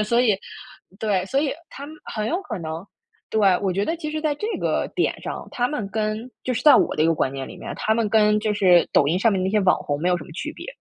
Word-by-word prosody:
所 235 +3 +2
以 215 -5 +4 0.6
对， 200 -4 0
所 270 +7 +1
以 290 -2 0 0.2
他 280 - -8
们 310 - -10
很 215 -1 -3
有 345 +4 -1
可 220 - -5
能 160 +3 -6 0.4
对， 220 - +1 0.2
我 190 -2 +1
觉 200 +3 0
得 330 - -1
其 305 -2 -5
实 310 0 -3
在 305 -2 0
这 420 - -4
个 - - 0
点 - - 0
上， - - -5
他 245 0 0
们 215 -10 -3
跟- 215 +3 -2
就 255 - 0
是 250 +1 -2
在 300 - +8
我 - - +2
的 155 - +2
一 160 - +4
个 165 - +3
观 135 -3 0
念 135 -1 -5
里 - - -10
面- - - -6
他 220 - +1
们 225 -2 +1
跟 210 0 +4
就 215 0 0
是 185 -4 +5
抖 140 - +4
音 175 +4 +1
上 225 +1 +3
面 185 -1 0
那 190 - 0
些 215 - +2
网 185 -1 +4
红 145 0 -3
没 175 - +1
有 180 - +3
什 150 - -9
么 - - -14
区 175 - -5
别。 - - -9
215 Hz, 305 characters per minute, -23 LUFS, 180-250 Hz, 0.6 s, 在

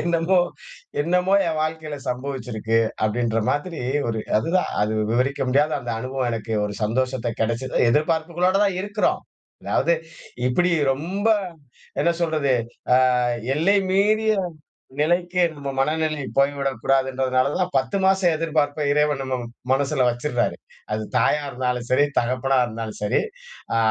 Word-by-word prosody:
என்னமோ, 170 +2 +2 0.6
என்னமோ 180 +4 +2
என் 160 -1 -1
வாழ்க்கைல 155 -1 -3
சம்பவிச்சிருக்கு, 125 -4 -2 0.2
அப்படின்ற 115 +1 +1
மாதிரி. 155 +2 -2 0.3
ஒரு 110 -1 -2 0.2
அதுதான் 170 +11 0
அது 110 +1 +1
விவரிக்க 130 +2 0
முடியாத 145 +4 +3
அந்த 120 -1 -4
அனுபவம். 130 0 -2
எனக்கு 115 0 -4
ஒரு 105 0 -4
சந்தோஷத்த 125 +1 -1
கிடைச்சது. 115 +3 -1
எதிர்பார்ப்புகளோட 165 +5 +1
தான் 190 -2 0
இருக்கிறோம். 205 +1 0 0.4
அதாவது 170 - +2 0.5
இப்பிடி 175 +8 +2 0.2
ரொம்ப, 180 +9 -3 0.8
என்ன 170 - +3
சொல்றது? 155 -5 +1 0.4
அ - - +6 0.6
எல்லை 195 +6 +3
மீறிய 215 +3 +3 0.7
நிலைக்கு 175 +3 +2
நம்ம 140 -2 -6
மனநிலை 155 +1 0
போய்விடக்கூடாதுன்றதுனால 135 -1 +1
தான் - - 0
10 135 +9 0
மாசம் 190 -3 +3
எதிர்பார்ப்ப 155 -2 0
இறைவன் 150 -1 +2
நம்ம 130 -1 -2 0.3
மனசுல 135 -1 +2
வச்சுடறாரு. 120 0 -1 0.4
அது 110 - -2
தாயா 130 +5 +3
இருந்தாலும் 125 -1 -2
சரி, 140 +3 +5
தகப்பனா 130 +2 +1
இருந்தாலும் 110 -1 -6
சரி. 105 - +2 0.5
அ - - +3
140 Hz, 125 wpm, -23 LUFS, 125-165 Hz, 0.8 s, அ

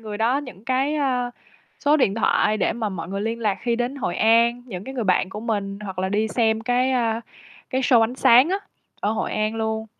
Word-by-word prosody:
người 215 -2 -6
đó 235 +5 +2
những 240 -9 -10
cái, 265 +4 0
ơ, 255 -4 0 0.5
số 295 +1 +5
điện 230 -9 +2
thoại 215 -1 +2
để - - +1
mà 225 -2 -3
mọi 185 -4 -6
người 195 +1 -3
liên 225 +2 -3
lạc 210 -4 0
khi 235 -1 0
đến 245 +3 -2
Hội 195 -10 -3
An, 235 +2 +3
những 190 -5 -7
cái 265 - -7
người 240 - -2
bạn 185 0 +2
của 210 - -6
mình, 205 -3 -3
hoặc 190 -2 -7
là 190 0 0
đi 215 +2 0
xem 220 -1 +1
cái, 250 +2 +1
a, 230 -3 0 0.5
cái 260 0 0
show 250 -2 +4
ánh 225 +2 +1
sáng 255 +2 +6
á, 380 - +1 0.4
ở 205 - 0
Hội 225 - -2
An 215 +1 -1
luôn. 220 0 -2
225 Hz, 235 wpm, -23 LUFS, 210-250 Hz, 0.5 s, sáng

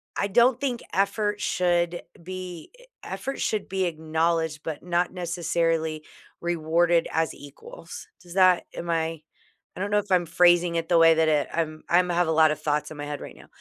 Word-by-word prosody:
I 200 - 0
don't 240 +4 +4
think 250 -4 -2
effort 205 +1 0
should 175 -1 0 0.2
be 180 -1 -8 0.3
effort 275 - -5
should 215 -2 -1
be 190 0 0
acknowledged, 160 -1 -1
but 160 -1 -5
not 175 0 0
necessarily 165 -3 -1 0.4
rewarded 170 0 +1
as 160 0 0
equals. 145 +4 -11
Does 175 -1 -12
that 185 -2 +4
am 170 - -6
I, 165 -1 -1 0.5
I - - -9
don't 200 +2 -3
know 210 - +4
if 205 -1 -7
I'm 180 -1 +3
phrasing 175 +1 +3
it 165 0 -2
the 170 - +4
way 165 0 +7
that 160 0 +2
it 150 -2 +2
I'm 155 -2 -3
I'm 180 +1 +3
have 175 -1 +1
a - - +1
lot 160 -1 +5
of 150 0 -4
thoughts 150 0 -1
in 155 - -9
my 145 - -5
head 145 0 -5
right - - -9
now, - - -16
170 Hz, 190 wpm, -25 LUFS, 160-180 Hz, 0.5 s, way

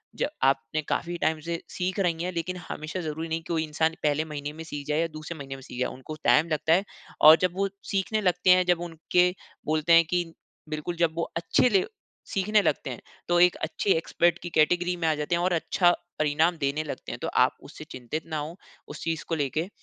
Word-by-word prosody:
ज - - 0 0.2
आपने 135 +3 +1
काफ़ी 175 +1 -1
टाइम 160 0 +1
से 170 0 -2
सीख 185 +2 -3
रही 170 -3 0
हैं, 180 - -2
लेकिन 180 +2 -3
हमेशा 155 +5 -5
ज़रूरी 160 0 -4
नहीं 165 +1 -1
कि - - -2
वो 165 - +1
इंसान 160 +1 0
पहले 150 +1 +1
महीने 150 -1 -5
में 160 +1 -8
सीख 145 -3 -7
जाए 150 +1 +1
या 165 - +1
दूसरे 155 +2 -7
महीने 135 -1 -6
में 135 - -11
सीख 125 - -9
जाए, 125 - +1
उनको 130 +4 -8
टाइम 160 +3 +5
लगता 160 +1 +2
है। 190 +3 +3 0.4
और 155 +1 +10
जब 185 -1 +2
वो 195 +1 +1 0.2
सीखने 205 +2 0
लगते 180 -1 +1
हैं, 180 0 +6
जब 175 -1 +2
उनके 175 +1 +1 0.4
बोलते 155 +2 +2
हैं 165 0 +7
कि 180 -1 +1 0.5
बिल्कुल 155 +3 -4
जब 170 -2 +2
वो 170 - +1
अच्छे 170 +8 +3
ले 195 -4 +3 0.5
सीखने 210 +2 +3
लगते 140 - -1
हैं, 125 - -7 0.3
तो 175 0 +3
एक 180 0 +5
अच्छे 165 +5 -3
एक्सपर्ट 170 +1 +1
की 175 - -4
कैटेगरी 175 +3 +2
में 165 -1 -1
आ 155 - +3
जाते 150 +3 -1
हैं 170 - 0
और 185 - +2
अच्छा 175 +1 +3 0.3
परिणाम 160 +3 +2
देने 145 +1 -1
लगते 150 - -6
हैं। - - -6
तो - - -2
आप - - +2
उससे - - -10
चिंतित 130 +5 -5
ना 155 -1 -3
हों, 150 +3 -5 0.3
उस - - -8
चीज़ 165 -1 -2
को 165 - +1
लेके। 155 +5 -1
165 Hz, 225 wpm, -27 LUFS, 155-175 Hz, 0.5 s, और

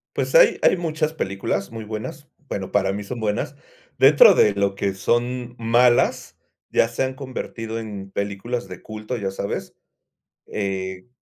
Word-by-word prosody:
Pues, - - -2
hay - - +7
hay - - +5
muchas 155 -2 -1
películas 100 -6 -2
muy 115 -1 -6
buenas, 125 +8 -6 0.2
bueno, 95 -2 -4
para 95 0 +2
mí 105 +1 -4
son 120 +4 -6
buenas, 105 -2 -2 0.4
dentro - - +8
de 105 - +4
lo 100 -1 0
que 100 0 -1
son 120 +4 -1
malas, 120 +1 +3 0.3
ya - - +4
se 115 +3 -2
han 130 0 -2
convertido 115 -4 -5
en 100 -3 -7
películas 100 +2 -3
de 90 -1 -9
culto, 110 +3 -6
ya 95 -3 -3
sabes, 100 +1 -4 0.7
eh 95 -1 -4
110 Hz, 155 wpm, -23 LUFS, 100-125 Hz, 0.7 s, dentro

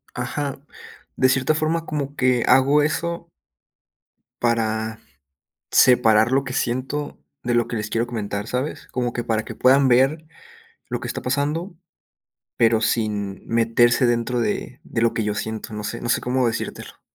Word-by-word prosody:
Ajá. 140 +3 -3 0.6
De 130 - +4
cierta 130 +3 +2
forma, 155 +1 -1
como 145 -2 -3
que 125 -2 +2
hago 140 +3 +5
eso 170 +3 -2 1.1
para 110 -2 0 0.7
separar 110 -2 +5
lo 135 +1 +3
que 130 - -6
siento 130 +5 -2 0.2
de 120 - 0
lo 120 -1 +2
que 115 - -2
les 105 0 -4
quiero 115 +2 0
comentar, 105 -3 -4
¿sabes? 130 +6 -3
Como 120 -2 -2
que 120 - -3
para 110 -1 -1
que - - -8
puedan 135 +1 +4
ver 135 +6 +3 0.6
lo - - -2
que - - -6
está - - -4
pasando, 150 +8 -1 0.8
pero 115 -1 +3
sin 105 -3 -1
meterse 115 +2 +3
dentro 120 +1 0
de 115 - -3
de 115 - -3
lo 115 - +2
que 110 - -1
yo 105 0 -1
siento. 110 0 -5
No 105 - -5
sé 115 +3 -5
no 120 - -4
sé - - +2
cómo 125 0 +1
decírtelo. 115 - -5
120 Hz, 160 wpm, -22 LUFS, 115-135 Hz, 1.1 s, hago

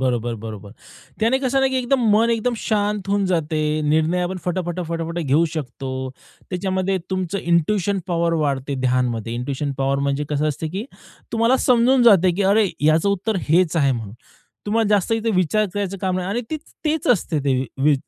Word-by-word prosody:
बरोबर, 120 -2 0
बरोबर. 105 -2 -8 0.5
त्याने 230 +4 +3
कसं 270 0 +1
ना, 270 - +3
की 265 - -1
एकदम 255 +1 +1
मन 225 +2 +3
एकदम 235 +1 0
शांत 205 -2 -1
होऊन 200 0 +1
जाते. 160 -3 0 0.2
निर्णय 160 +4 +1
आपण 180 +2 -2
फटा, 180 +1 0
फटा, 175 +1 -4
फटा, 165 0 -2
फटा 170 +1 -3
घेऊ 150 +1 +2
शकतो. 135 -3 -5 0.6
त्याच्यामध्ये 190 +1 -1
तुमचं 185 0 -2
इंट्युशन 180 +3 +1
पॉवर 170 -2 0
वाढते 140 0 -2
ध्यानमध्ये. 125 -3 0
इंट्यूशन 140 +3 -3
पॉवर 135 0 +1
म्हणजे 140 +1 -1
कसं 150 +1 0
असते 155 +2 -3
की 190 +7 -4 0.5
तुम्हाला 230 +3 +3
समजून 250 +1 +4
जाते, 190 -6 +6
की 195 +4 -1
अरे 220 +1 +4 0.2
ह्याचं 155 +5 +3
उत्तर 200 +2 0
हेच 170 +1 +3
आहे 140 -4 +3
म्हणून. 110 -4 -6 0.5
तुम्हाला 220 +1 +1
जास्त 205 0 +2
इथे 225 0 0
विचार 185 +4 +2
करायचं 200 -1 -2
काम 185 -1 -1
नाही 185 0 -3
आणि 230 +5 -1
ते 315 - -1 0.3
तेच 310 +1 0
असते 175 -9 +2
ते 135 -2 +2 0.2
वी 150 +1 +5
180 Hz, 185 wpm, -21 LUFS, 150-210 Hz, 0.6 s, जाते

